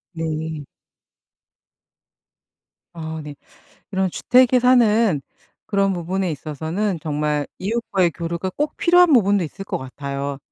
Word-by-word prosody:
네. 160 Hz, -1 st, -3 dB, 2.3 s
아 160 Hz, -1 st, -5 dB
네. 145 Hz, -1 st, -8 dB, 0.6 s
이런 190 Hz, -1 st, 0 dB
주택에 250 Hz, +5 st, +4 dB
사는 230 Hz, -, +4 dB, 0.5 s
그런 200 Hz, -1 st, +1 dB
부분에 185 Hz, +1 st, -2 dB
있어서는 160 Hz, +6 st, -3 dB
정말 150 Hz, -1 st, -1 dB
이웃과의 195 Hz, -4 st, 0 dB
교류가 170 Hz, +3 st, -4 dB
꼭 295 Hz, +9 st, -3 dB
필요한 355 Hz, -1 st, +5 dB
부분도 200 Hz, -6 st, +4 dB
있을 195 Hz, +5 st, -8 dB
것 -, -, -3 dB
같아요. 140 Hz, +1 st, -5 dB
180 Hz, 235 characters per minute, -21 LUFS, 155-210 Hz, 2.3 s, 필요한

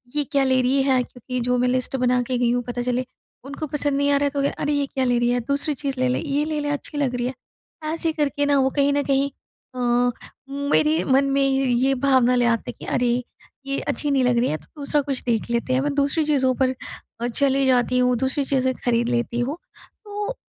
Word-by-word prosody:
ये 295 Hz, -, +1 dB
क्या 275 Hz, -1 st, +3 dB
ले 260 Hz, -1 st, +3 dB
रही 265 Hz, +2 st, +2 dB
है", 265 Hz, -2 st, +3 dB
क्योंकि 250 Hz, +1 st, -6 dB
जो 250 Hz, +1 st, +1 dB
मैं 250 Hz, 0 st, +2 dB
लिस्ट 255 Hz, +1 st, -1 dB
बना 250 Hz, 0 st, +2 dB
के 250 Hz, 0 st, -2 dB
गई 240 Hz, -1 st, +2 dB
हूँ 245 Hz, 0 st, 0 dB
पता 245 Hz, 0 st, -3 dB
चले, 250 Hz, +1 st, -1 dB, 0.4 s
उनको 285 Hz, +3 st, -5 dB
पसंद 290 Hz, -1 st, -1 dB
नहीं 285 Hz, 0 st, +2 dB
आ 280 Hz, -, +4 dB
रहा 285 Hz, -, +1 dB
है, 285 Hz, -, +2 dB
तो 280 Hz, -1 st, -1 dB
कह 280 Hz, -, +2 dB
"अरे 295 Hz, 0 st, +1 dB
ये 285 Hz, -1 st, +1 dB
क्या 265 Hz, -1 st, -1 dB
ले 245 Hz, -1 st, +2 dB
रही 240 Hz, 0 st, +2 dB
है, 245 Hz, -, +1 dB
दूसरी 285 Hz, +2 st, 0 dB
चीज़ 275 Hz, -1 st, -4 dB
ले 255 Hz, -, +2 dB
ले। 255 Hz, -, 0 dB
ये, 290 Hz, 0 st, -1 dB
ले 310 Hz, -1 st, -2 dB
ले 290 Hz, 0 st, -2 dB
अच्छी 290 Hz, +1 st, -4 dB
लग 265 Hz, -4 st, 0 dB
रही 245 Hz, 0 st, -1 dB
है।" 255 Hz, -, -3 dB, 0.6 s
ऐसे 330 Hz, -1 st, -1 dB
करके 290 Hz, -1 st, 0 dB
ना 285 Hz, 0 st, +3 dB
वो 265 Hz, 0 st, +3 dB
कहीं 280 Hz, 0 st, +4 dB
न 285 Hz, -, +2 dB
कहीं 275 Hz, 0 st, +1 dB, 0.5 s
अ, 255 Hz, -, -5 dB, 0.7 s
मेरे 290 Hz, +3 st, +1 dB
मन 270 Hz, +1 st, +3 dB
में 275 Hz, 0 st, +2 dB
ये 265 Hz, 0 st, +2 dB
भावना 255 Hz, -2 st, +3 dB
ले 245 Hz, -, +2 dB
आते 230 Hz, -1 st, 0 dB
हैं -, -, -20 dB
कि, -, -, -8 dB
अरे 245 Hz, 0 st, 0 dB, 0.4 s
ये 275 Hz, 0 st, -2 dB
अच्छी 295 Hz, -1 st, -2 dB
नहीं 265 Hz, -2 st, +2 dB
लग 245 Hz, -1 st, +2 dB
रही 245 Hz, -, +1 dB
है, 155 Hz, -, -1 dB
तो -, -, -20 dB
दूसरा 290 Hz, +1 st, +1 dB
कुछ 275 Hz, -2 st, -3 dB
देख 235 Hz, -2 st, -1 dB
लेते 235 Hz, +2 st, 0 dB
हैं। 260 Hz, -, +2 dB
मैं 290 Hz, 0 st, -1 dB
दूसरी 285 Hz, +2 st, +1 dB
चीज़ों 265 Hz, -4 st, +2 dB
पर 260 Hz, 0 st, +3 dB, 0.5 s
अ, 240 Hz, -, 0 dB
चले 275 Hz, +2 st, +1 dB
जाती 250 Hz, -1 st, +2 dB
हूँ, 250 Hz, 0 st, +3 dB
दूसरी 265 Hz, +3 st, 0 dB
चीज़ें 260 Hz, -1 st, +1 dB
खरीद 235 Hz, 0 st, +1 dB
लेती 240 Hz, 0 st, -1 dB
हूँ। 270 Hz, +6 st, -2 dB, 0.5 s
तो 415 Hz, +4 st, -4 dB
265 Hz, 245 wpm, -23 LUFS, 250-285 Hz, 0.7 s, आ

